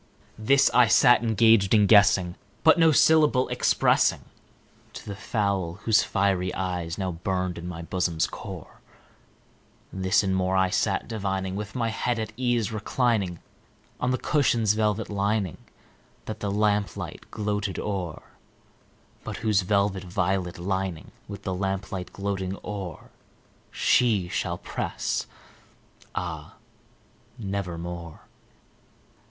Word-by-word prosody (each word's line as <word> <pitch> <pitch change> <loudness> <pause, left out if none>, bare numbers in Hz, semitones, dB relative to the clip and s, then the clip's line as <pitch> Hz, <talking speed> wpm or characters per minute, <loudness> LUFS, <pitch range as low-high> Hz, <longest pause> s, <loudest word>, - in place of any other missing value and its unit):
This 135 +5 +4
I 125 -1 +6
sat 120 +2 +6
engaged 110 -2 +4
in 105 -1 +5
guessing, 100 -4 +5 0.3
but 160 +1 +6
no 165 -1 +6
syllable 150 -4 +4
expressing - - +2 0.7
To - - -9
the 100 - -6
fowl 100 -5 -1
whose 110 -1 +4
fiery 95 -2 0
eyes 90 -3 -3
now 95 -2 -2
burned 90 +1 -3
into 85 +1 -6
my 85 -1 -6
bosom's 85 -2 0
core; - - -9 1.1
This 95 +2 +2
and 95 -1 0
more 95 0 +1
I 95 -1 +2
sat - - 0
divining, 95 -4 -3
with 105 +2 -6
my 115 -2 0
head 120 +2 -1
at 110 -1 -4
ease 120 -3 0
reclining 110 -4 -1 0.6
On 125 - 0
the 130 - +1
cushion's 120 -9 +2
velvet 110 0 0
lining 100 -2 -1 0.7
that - - -6
the 100 - -3
lamplight 105 0 -1
gloated 105 -2 -2
o'er, 95 -6 -4 1.0
But - - -6
whose 105 -2 +3
velvet 100 0 0
violet 90 0 -1
lining 95 -2 -3 0.2
with 100 -1 -8
the 95 - -2
lamplight 95 -1 -3
gloating 100 -1 -3
o'er 95 -6 -7 0.6
She 105 -8 +2
shall 85 -1 -2
press, - - -3 0.9
ah, 80 -4 -5 0.8
nevermore! 85 -5 -5
100 Hz, 120 wpm, -26 LUFS, 90-110 Hz, 1.1 s, I